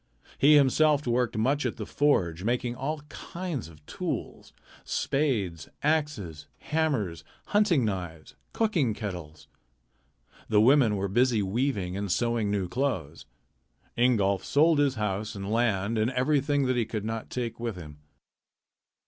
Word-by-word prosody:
He 150 +2 +7
himself 145 +1 +4
worked 120 -1 0
much 135 +7 +1
at - - -2
the - - -5
forge, 90 - +1
making 120 +2 0
all 150 +4 -3
kinds 170 - -5
of 75 -2 -18
tools - - -5 0.3
spades, 105 - -1
axes, 140 - -1
hammers, 130 - -1 0.3
hunting 200 - +3
knives, 90 -6 -5 0.2
cooking 170 - +1
kettles. 90 -8 -7 1.0
The 105 -2 +4
women 120 -1 +5
were 100 0 -1
busy 120 +1 +2
weaving 100 -3 -1
and 100 -1 -3
sewing 115 0 0
new 100 -3 -1
clothes. 105 - -3 0.7
Ingolf 105 -6 +2
sold 155 +1 +3
his 140 -2 +2
house 105 0 -2
and 100 +1 -5
land 110 -2 +1
and 110 +2 +2
everything 140 +2 +1
that 130 0 +1
he 120 - +2
could 110 -2 -4
not 115 0 -4
take 120 -3 -4
with 115 -3 -3
him. 75 -4 -10
115 Hz, 135 wpm, -27 LUFS, 100-140 Hz, 1.0 s, He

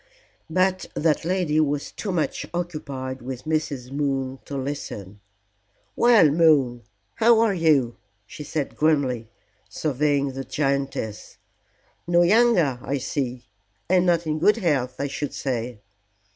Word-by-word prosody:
But 185 +2 +1
that 155 -1 +1
lady 170 -3 +1
was 145 -2 0
too 205 - -5
much 170 -4 -2
occupied 140 -7 -5
with 125 0 -6
Mrs. 150 -5 -2
Moon 135 -2 -2
to 140 - -5
listen. 130 -8 -6 0.8
"Well, 225 -11 +5
Moon, 145 -7 +3 0.4
how 230 0 +5
are 225 -3 +3
you?" 150 -9 +2 0.3
she 150 - -9
said 145 -1 -3
grimly, 135 -7 +1 0.4
surveying 145 -1 0
the 135 +1 -5
giantess. 135 -7 -3 0.7
"No 175 0 +4
younger, 180 - +3
I 140 +4 -2
see, 130 -2 -3 0.4
and 180 0 +3
not 170 -1 +2
in 155 0 -1
good 205 +6 +4
health, 135 - 0
I 140 - -2
should 140 +1 -4
say." 120 -4 -3
145 Hz, 130 wpm, -24 LUFS, 130-170 Hz, 0.8 s, Well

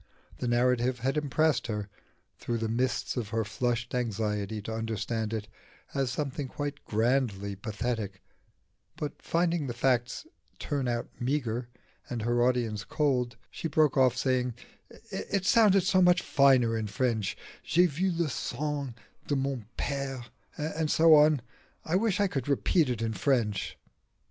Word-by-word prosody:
The 125 - -2
narrative 125 0 +2
had 135 +3 0
impressed 150 -3 +1
her, 105 -3 -3 0.5
through 120 - -2
the 115 0 -1
mists 125 +3 -1
of 115 -4 -2
her 115 0 0
flushed 120 +2 -2
anxiety 110 -3 -1
to 110 - -4
understand 110 0 -2
it, 110 -2 -3 0.5
as 135 -3 0
something 140 +1 -3
quite 145 +1 -5
grandly 110 -3 0
pathetic; 105 -2 -4 0.7
but 150 - -5
finding 170 -3 0
the 120 - -4
facts 125 - 0 0.3
turn 140 -4 -2
out 120 -1 -1
meagre, 120 -2 -1 0.4
and 120 -3 -3
her 120 +1 +1
audience 120 -4 +1
cold, 125 -5 0
she - - -4
broke 155 -2 +3
off, 130 -2 +4
saying, 125 -2 0 0.6
"It 195 -2 -2
sounded 200 -4 +5
so 185 0 +3
much 180 0 +5
finer 130 -5 +4
in 110 -1 -2
French 110 -1 -1 0.3
j'ai 175 +2 +4
vu 180 +4 0
le 170 -1 0
sang 140 0 -3 0.3
de 145 - +1
mon 135 -5 -2
père, 135 -3 -3 0.3
and 155 +1 -2
so 165 +1 +6
on 150 -3 +6 0.4
I 165 - 0
wish 205 0 +2
I 205 - +4
could 140 -9 -2
repeat 145 +2 +2
it 115 -2 -2
in 110 -1 -1
French." 115 -7 0
125 Hz, 150 wpm, -29 LUFS, 115-145 Hz, 0.7 s, so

